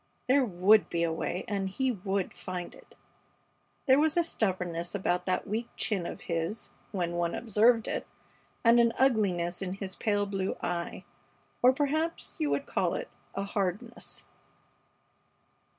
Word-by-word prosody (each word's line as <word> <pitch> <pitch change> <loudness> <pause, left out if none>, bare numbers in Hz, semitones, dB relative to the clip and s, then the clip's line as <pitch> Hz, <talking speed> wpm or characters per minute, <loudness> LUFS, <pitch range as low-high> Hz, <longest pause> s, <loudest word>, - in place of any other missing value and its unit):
There 270 +2 +5
would 205 0 +4
be 170 -1 0
a 165 -1 +1
way 175 +2 -3
and 195 -2 -1
he 260 +6 0
would 195 -3 -2
find 180 -1 -6
it. - - -17 0.9
There 265 0 +6
was 315 +2 +2
a 345 - +5
stubbornness 180 - -1
about 180 -2 0
that 185 - 0
weak 225 +4 -2
chin 200 -5 -1
of - - -7
his, 165 +6 -3 0.2
when 175 -4 -1
one 175 -1 -1
observed 225 +1 +3
it, - - -3 0.6
and 235 0 +6
an 235 -1 +4
ugliness 195 -9 +2
in 185 -1 -2
his 195 -1 -6
pale 205 -2 +1
blue 195 -1 -2
eye; 170 -1 -3 0.6
or 250 - +7
perhaps 300 +4 -1
you 305 -2 +1
would 280 - 0
call - - 0
it - - -4 0.3
a 195 - -1
hardness. 200 +4 -3
200 Hz, 150 wpm, -30 LUFS, 180-240 Hz, 0.9 s, or